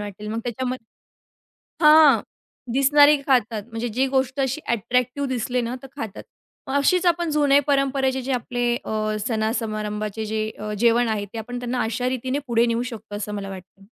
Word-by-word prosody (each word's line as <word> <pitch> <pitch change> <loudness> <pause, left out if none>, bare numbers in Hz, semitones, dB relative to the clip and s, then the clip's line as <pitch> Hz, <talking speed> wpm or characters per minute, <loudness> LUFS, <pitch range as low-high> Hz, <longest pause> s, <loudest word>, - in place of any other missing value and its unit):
वाटेल. 205 0 -7
मग 225 +1 -3
त्याच्यामध्ये 250 -1 -5 0.8
हां, 300 -6 +7 0.5
दिसणारे 290 +3 +6
खातात. 235 -5 +2
म्हणजे 230 +1 -3
जी 255 +5 0
गोष्ट 265 0 0
अशी 270 +3 -1
अट्रॅक्टिव्ह 250 +4 0
दिसली 250 0 -1
ना 235 +2 -3
तर - - -8
खातात. 220 -7 -6 0.4
मग 265 - -4
अशीच 360 +6 +2
आपण 345 -1 +2
जुन्या 285 -1 +4
परंपरेचे 270 -2 +1
जे 265 +1 -2
आपले 245 0 -1
अ, 215 0 -2
सण 220 -2 0
समारंभाचे 215 0 -4
जे 215 0 -2
अ, 210 0 -5
जेवण 235 +1 +3
आहे, 210 -2 -1
ते 215 +3 -9
आपण 245 +3 -5
त्यांना 245 0 -2
अशारीतीने 255 +4 -2
पुढे 235 0 +2
नेऊ 235 +1 0
शकतो, 225 -4 -8
असं 210 0 -5
मला 200 -1 -5
वाटतं. 190 +1 -11
240 Hz, 165 wpm, -23 LUFS, 220-265 Hz, 0.8 s, हां